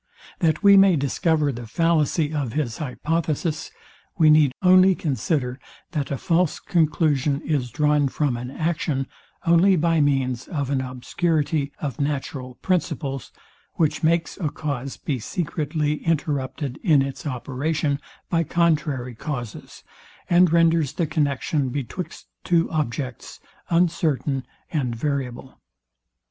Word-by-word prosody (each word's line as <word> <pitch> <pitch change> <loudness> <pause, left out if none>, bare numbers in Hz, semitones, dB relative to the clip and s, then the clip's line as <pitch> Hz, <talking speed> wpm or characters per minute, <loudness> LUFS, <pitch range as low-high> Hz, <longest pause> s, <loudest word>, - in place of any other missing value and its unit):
That 160 +1 +1
we 200 -1 +8
may 195 -2 +6
discover 150 +1 +1
the 120 -2 -7
fallacy 160 +1 +1
of 140 -6 -2
his 135 -6 -2
hypothesis, 155 +2 -2 0.5
we 155 -3 +6
need 150 -3 +5
only 185 +1 +6
consider, 140 -4 -1 0.3
that 150 -5 -2
a 140 - -2
false 175 0 +1
conclusion 150 -4 +1
is 140 -7 -1
drawn 150 +2 +2
from 140 -1 0
an 125 +1 -5
action, 155 -2 -1 0.4
only 175 +3 +5
by 165 -1 +2
means 130 -3 0
of 145 -5 -3
an 135 -2 +1
obscurity 145 +3 -1
of 145 0 -4
natural 135 -3 -3
principles, 145 -7 -1 0.4
which 155 -3 +1
makes 165 +1 +1
a 160 -6 0
cause 140 -3 -4
be 135 -4 -3
secretly 150 - -2
interrupted 145 -3 -1
In 155 -9 +4
its 135 +2 -5
operation, 140 +3 -1 0.3
by 165 -1 +1
contrary 150 -6 0
causes, 120 -2 -6 0.4
and 175 -1 +5
renders 165 -3 +3
the 170 - 0
connexion 145 -2 0
betwixt 140 +7 -5 0.2
two 170 -1 +2
objects 135 -5 -3 0.3
uncertain 160 -6 +1 0.2
and 130 -7 -1
variable. 130 -1 -4
150 Hz, 125 wpm, -23 LUFS, 135-165 Hz, 0.5 s, we